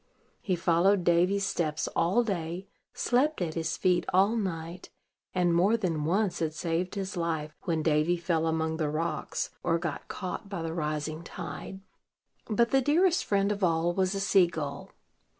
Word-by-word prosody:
He 185 - 0
followed 175 +3 +3
Davy's 180 +4 +3
steps 155 -4 -1
all 185 +9 +2
day, 180 -3 -3 0.3
slept 280 +6 +1
at 170 -4 -2
his 165 0 -2
feet 180 -2 +2
all 195 +5 +4
night, 175 -4 -4 0.5
and 175 -1 +3
more 195 +7 +4
than 165 -8 -1
once 195 +4 +1
had 160 -1 -1
saved 175 +3 -2
his 195 0 -4
life 160 -3 -2
when 165 -2 0
Davy 155 +3 +2
fell 170 -2 0
among 160 0 0
the 155 -2 0
rocks, 160 +3 -2
or 165 -1 +1
got 165 -3 -4
caught 190 +1 -5
by 185 -5 -4
the 165 0 -3
rising 155 -1 -3
tide. 190 +3 -7 0.7
But 235 +2 +2
the 270 - +4
dearest 340 +6 +3
friend 200 0 +1
of 205 -1 -3
all 170 0 +2
was 190 +1 0
a - - -1
sea 195 -2 +4
gull. 155 -4 -5
175 Hz, 170 wpm, -29 LUFS, 160-195 Hz, 0.7 s, all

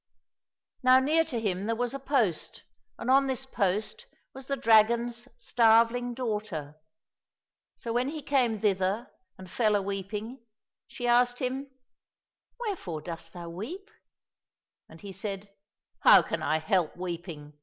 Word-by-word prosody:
Now 255 0 +6
near 305 +5 +3
to 260 -7 -3
him 200 -2 -2
there 230 - 0
was 245 +1 -2
a 275 - -4
post, 255 - -1 0.3
and - - -7
on 275 +1 +5
this 265 0 -2
post 220 - -2 0.3
was 265 0 -10
the 275 - 0
dragon's 235 +1 +3
starveling 240 - +3
daughter. 210 - -4 1.0
So 230 -2 -4
when 250 +3 +1
he 305 -1 -6
came 245 -7 +1
thither 195 +3 0 0.3
and 185 - -11
fell 215 +3 +1
a 205 - +2
weeping, 205 +5 -5 0.5
she 245 - -6
asked 245 0 +3
him, 265 +2 -3 0.4
" - - -53
Wherefore 325 - -4
dost 165 -1 -7
thou 170 -1 -8
weep? 325 - -7 0.3
" - - -65
— - - -59
And 160 0 -14
he 200 - -8
said, 195 +1 -5 0.3
*' - - -53
How - - +8
can - - -3
I 155 - +1
help 160 +1 0
weeping 170 -4 -6
230 Hz, 155 wpm, -28 LUFS, 190-255 Hz, 1.0 s, How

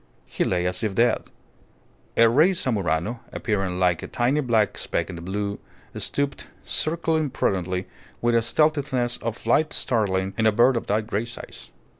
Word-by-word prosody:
He - - -2
lay 90 -1 0
as 90 +4 -2
if 105 -3 -1
dead. 120 +1 +2 0.9
A 115 - +7
rey 155 +11 +4
zamuro, 105 - -1
appearing 95 -5 -2
like 90 -2 +2
a - - -6
tiny 130 +5 +1
black 115 -6 +2
speck - - -2
in - - -7
the 85 - -8
blue, 100 +3 -3 0.4
stooped, 140 -1 -2 0.2
circling 160 -1 0
prudently 95 -5 -1 0.3
with 120 0 +1
a 115 - +4
stealthiness 135 -2 +1
of 115 -1 -4
flight 150 +7 +1
startling 95 -5 0
in 110 - +4
a - - +5
bird 120 +5 +4
of 115 - -3
that 105 +1 +1
great 110 +1 -2
size. 115 - -9
115 Hz, 165 wpm, -24 LUFS, 95-130 Hz, 0.9 s, A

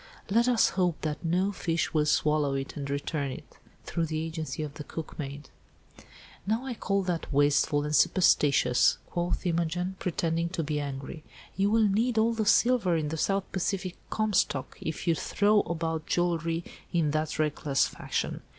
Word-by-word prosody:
"Let 235 +4 +4
us 245 -2 +4
hope 180 -4 0
that 155 +1 -3
no 180 +4 +1
fish 170 -4 -1
will 150 -1 +2
swallow 150 -2 +2
it, 135 0 -4
and 140 -2 -5
return 140 0 -2
it, - - -11 0.3
through 165 -1 -1
the 155 0 -2
agency 160 -1 -4
of 145 -2 -6
the 150 0 -7
cookmaid." 145 -3 -7 1.0
"Now, 225 +5 0
I 260 - -3
call 200 -3 -1
that 175 -4 -3
wasteful 145 +1 +3
and 150 +1 -1
superstitious," 140 -9 +4
quoth 175 +2 -2
Imogen, 175 +2 -1
pretending 170 -1 -1
to 170 -2 -2
be 150 0 -2
angry. 140 +2 -6 0.3
"You 195 +1 +2
will 220 0 +4
need 225 +4 +1
all 225 +1 +3
the 220 -2 -1
silver 230 -6 +4
in 155 -2 -2
the 160 - -3
South 195 +4 0
Pacific 185 -1 -2
Comstock, 205 -10 0
if 160 - -4
you 170 - +5
throw 205 +6 +2
about 165 -3 -2
jewellery 170 -1 0 0.3
in 160 -4 +1
that 155 0 -1
reckless 150 -2 +1
fashion. - - -3
165 Hz, 165 wpm, -28 LUFS, 150-190 Hz, 1.0 s, you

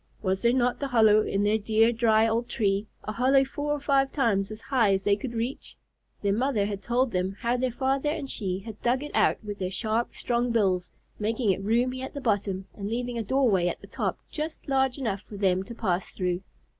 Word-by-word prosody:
Was 190 -1 0
there 235 - +4
not 250 -1 +1
the 280 - -2
hollow 220 -4 +5
in 200 -1 0
their 210 +2 +2
dear, 220 +2 +3
dry 225 -1 +3
old 230 +2 -1
tree, 200 -1 0 0.2
a - - -4
hollow 265 +4 +3
four 290 +2 -3
or 295 - 0
five 275 -1 +2
times 210 -8 +1
as 215 0 -7
high 230 -6 +2
as 195 0 0
they 200 +1 +3
could 235 +3 -6
reach? 235 +4 -4 0.5
Their 200 -1 +2
mother 230 -2 +1
had 200 -1 -4
told 240 +4 +1
them 185 +2 -1
how 235 +1 +1
their 255 +1 0
father 270 +4 0
and 300 -2 -3
she 190 -8 -2
had 215 0 -10
dug 255 +3 +1
it 295 - -6
out - - +3
with 205 -1 -6
their 185 -1 -1
sharp, 220 +4 -1
strong 240 0 0
bills, 190 -6 +1 0.3
making 220 0 +1
it 190 - -2
roomy 245 +5 +1
at 265 - -6
the - - -3
bottom, 200 -5 0
and 200 -1 -5
leaving 240 +1 -2
a - - -1
doorway 215 -7 +2
at - - -2
the - - -12
top - - -2
just 310 +1 -5
large 265 -1 +1
enough 215 -8 -2
for 205 - -8
them 190 -2 +2
to 230 +5 -8
pass 185 -5 -1
through. 180 -1 -2
225 Hz, 225 wpm, -27 LUFS, 200-255 Hz, 0.5 s, hollow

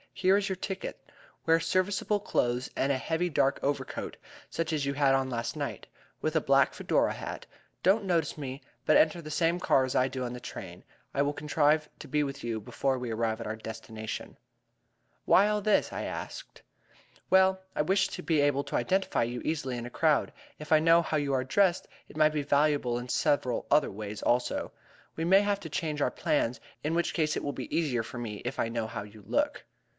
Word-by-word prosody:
"Here 190 0 +3
is 200 0 +1
your 190 - -1
ticket. 190 +1 -6 0.3
Wear 165 0 +5
serviceable 185 +5 +1
clothes 125 -9 0
and 135 - +1
a 135 - +1
heavy 165 +6 -1
dark 140 -3 +2
overcoat, 140 -2 -3 0.3
such 165 -1 -2
as 145 -2 0
you 140 - 0
had 140 -1 +3
on 135 -1 0
last 120 -2 -3
night, - - -4 0.4
with 155 +1 -1
a 160 - +4
black 135 -1 +4
Fedora - - +1
hat. - - -6 0.4
Don't 200 +3 +4
notice 165 -6 0
me, 135 -2 -6 0.2
but 155 - +6
enter 165 +2 +3
the 155 -1 -8
same 165 +3 +1
car 135 -6 +3
as 130 - -4
I 130 - +4
do 130 -1 -4
on 120 -1 -4
the 125 - -6
train. 90 -6 -8 0.3
I 140 - +1
will 145 +1 +1
contrive 150 +1 +2
to - - -9
be 150 0 +1
with 140 -1 -5
you 115 -2 -2
before 130 +5 -1
we 125 -2 -4
arrive 110 0 -1
at 115 - -5
our 110 - -3
destination." 110 0 -7 0.9
"Why 200 - +6
all 210 0 +1
this?" 210 +1 +2
I - - -3
asked. - - -7 0.7
"Well, 190 0 +4
I - - +2
wish 190 +3 +2
to 180 - -7
be 155 -3 +2
able 145 -1 +2
to - - -4
identify 190 -8 +1
you 120 +1 -3
easily 135 -6 -1
in 120 - -5
a - - -6
crowd. 155 0 +2 0.3
If 150 0 -9
I 155 - +7
know 165 +2 +5
how 160 - -1
you 145 -2 0
are 130 -1 +1
dressed, 180 +6 +2 0.2
it - - -12
might 155 0 +4
be 150 -2 -1
valuable 145 -4 +2
in 120 +1 -5
several 130 -2 +1
other 150 - +4
ways 105 +1 -6
also. 120 +1 0 0.4
We 165 - -2
may 190 +3 +6
have 205 -1 0
to 160 - -7
change 150 -1 -2
our - - +2
plans, 120 -5 0 0.2
in 155 +3 0
which 170 - 0
event 155 -2 +1
it - - -3
will 145 - -2
be 130 - -5
easier 135 -9 +1
for 120 - -8
me 110 -4 -5
if - - -4
I - - +1
know 115 -1 -2
how 105 -2 -5
you 105 0 -14
look." - - 0
145 Hz, 215 wpm, -29 LUFS, 125-165 Hz, 0.9 s, I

